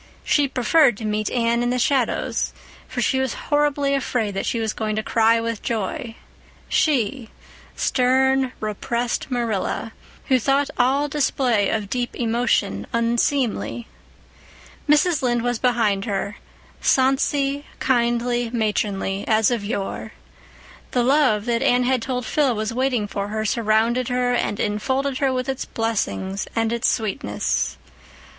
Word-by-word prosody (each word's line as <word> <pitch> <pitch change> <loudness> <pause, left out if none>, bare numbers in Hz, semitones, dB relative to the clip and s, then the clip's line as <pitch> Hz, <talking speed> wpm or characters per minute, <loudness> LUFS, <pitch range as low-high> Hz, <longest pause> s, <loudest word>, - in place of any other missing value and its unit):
She 290 -2 +2
preferred 260 -1 +3
to 220 - -6
meet 215 0 -1
Anne 235 -1 +1
in 240 - 0
the 250 - 0
shadows, 250 0 0 0.3
for - - -2
she 265 - +1
was 265 -3 -1
horribly 290 -1 +1
afraid 245 -6 -1
that 195 - -3
she 235 - 0
was 220 -1 -1
going 215 -1 -2
to 215 - -1
cry 230 +1 +3
with 230 -1 -3
joy—she, 230 - -2 0.5
stern, 260 +1 +2
repressed 235 +4 -2
Marilla, 230 -3 -2 0.3
who 260 -1 +3
thought 275 +3 +1
all 270 +4 +3
display 260 -7 +1
of 215 -2 -1
deep 245 +3 -3
emotion 230 - 0
unseemly. 235 0 0 1.0
Mrs. 305 +1 +4
Lynde 240 -2 +1
was 245 -2 -1
behind 225 -6 +1
her, 200 -1 -3 0.4
sonsy, 275 +2 +2
kindly, 240 -1 +1
matronly, 205 -4 -1
as 220 +1 +3
of 235 -4 -1
yore. 210 +1 -4 0.8
The 245 - +2
love 255 -6 +3
that 235 -1 0
Anne 250 -2 +3
had 255 -1 +1
told 250 0 -3
Phil 275 -1 +1
was 215 +1 -2
waiting 250 -3 0
for 200 0 -3
her 215 +1 -3
surrounded 230 +3 +1
her 250 0 +1
and 220 -4 -1
enfolded 260 +6 -1
her 275 -2 +2
with 255 0 -2
its 265 -1 -3
blessing 200 -4 -2 0.2
and 225 0 +1
its 235 +2 +1
sweetness. 190 - -1
240 Hz, 135 wpm, -22 LUFS, 220-260 Hz, 1.0 s, Mrs